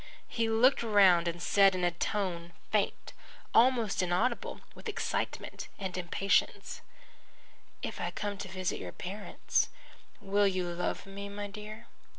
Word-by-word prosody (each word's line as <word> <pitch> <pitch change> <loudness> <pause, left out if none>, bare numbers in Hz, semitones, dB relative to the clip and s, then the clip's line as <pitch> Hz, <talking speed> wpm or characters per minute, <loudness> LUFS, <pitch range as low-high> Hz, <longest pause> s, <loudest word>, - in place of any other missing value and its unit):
He 230 -1 -1
looked 240 +5 +4
round 195 -6 +5
and 170 0 -2
said 195 +1 +5
in 180 - -2
a 175 - +3
tone 175 -2 -2 0.2
faint, 210 -2 0 0.4
almost 235 -4 +4
inaudible 185 +8 0
with 460 - -7
excitement 425 - -3
and 190 -2 -4
impatience: 185 +2 0 1.0
"If - - -4
I - - -1
come 205 -1 -4
to 200 - -5
visit 185 -1 -2
your - - -7
parents 200 +3 -1 0.5
will 200 +1 +2
you 185 -2 0
love 175 +3 -2
me, 200 +1 -7
my 205 0 -5
dear?" 210 +3 -8
200 Hz, 140 wpm, -31 LUFS, 185-215 Hz, 1.0 s, round